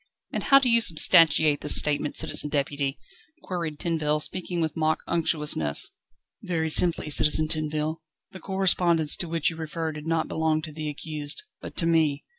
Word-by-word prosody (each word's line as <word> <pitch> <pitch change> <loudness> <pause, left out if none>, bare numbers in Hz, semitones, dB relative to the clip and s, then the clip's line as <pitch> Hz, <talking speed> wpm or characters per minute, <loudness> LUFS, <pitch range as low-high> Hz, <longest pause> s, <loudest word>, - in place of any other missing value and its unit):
"And - - -4
how 275 - +6
do 270 -2 +2
you 235 -1 +4
substantiate 160 -5 +4
this 150 - +4
statement, 150 0 +1
Citizen 150 - +2
Deputy?" 140 -1 -3 0.5
queried 170 -5 -5
Tinville, 155 -2 -2
speaking 175 +2 -3
with 160 -2 -2
mock 155 -1 -1
unctuousness. 150 - 0 0.5
"Very 160 -3 -3
simply, 165 -2 +2
Citizen 155 +2 +3
Tinville. 155 0 -2 0.3
The 190 - -11
correspondence 175 -5 +2
to 175 - -3
which 165 -1 0
you 165 - -11
refer 160 0 -5
did 150 +1 -9
not 165 -1 -1
belong 160 -1 -1
to 155 - -8
the 155 0 -6
accused, 150 - -6 0.2
but - - -10
to 165 - +2
me. 160 -4 +1
160 Hz, 165 wpm, -25 LUFS, 150-170 Hz, 0.5 s, how